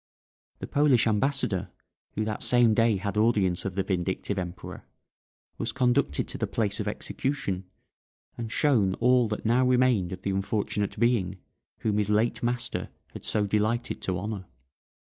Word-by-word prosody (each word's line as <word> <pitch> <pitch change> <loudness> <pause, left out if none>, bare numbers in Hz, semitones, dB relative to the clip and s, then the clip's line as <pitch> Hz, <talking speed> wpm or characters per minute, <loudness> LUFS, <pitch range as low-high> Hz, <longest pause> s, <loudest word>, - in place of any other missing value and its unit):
The - - -6
Polish 140 -5 +3
ambassador, 110 -4 0 0.5
who 110 - -1
that 110 -1 -3
same 120 -2 +4
day 115 -1 +3
had 100 +1 -3
audience 105 -6 +2
of 95 -2 -3
the 95 - 0
vindictive 95 +1 -1
Emperor, 90 0 -7 0.8
was 115 0 -2
conducted 120 - +1
to - - -4
the - - 0
place 100 -3 -1
of 105 - -2
execution, 100 -4 -3 0.7
and 115 -1 -5
shown 110 -12 +2
all 125 0 +3
that 105 +1 -4
now 120 +3 +3
remained 125 -7 +3
of 95 +1 -7
the 100 - -1
unfortunate 100 +1 -1
being 105 -6 +1 0.4
whom 105 -2 +1
his 105 -1 0
late 110 +3 +1
master 120 0 -1 0.2
had - - -9
so 105 -1 +1
delighted 110 +4 0
to 95 -1 -1
honour. 100 -1 -5
105 Hz, 155 wpm, -27 LUFS, 95-120 Hz, 0.8 s, same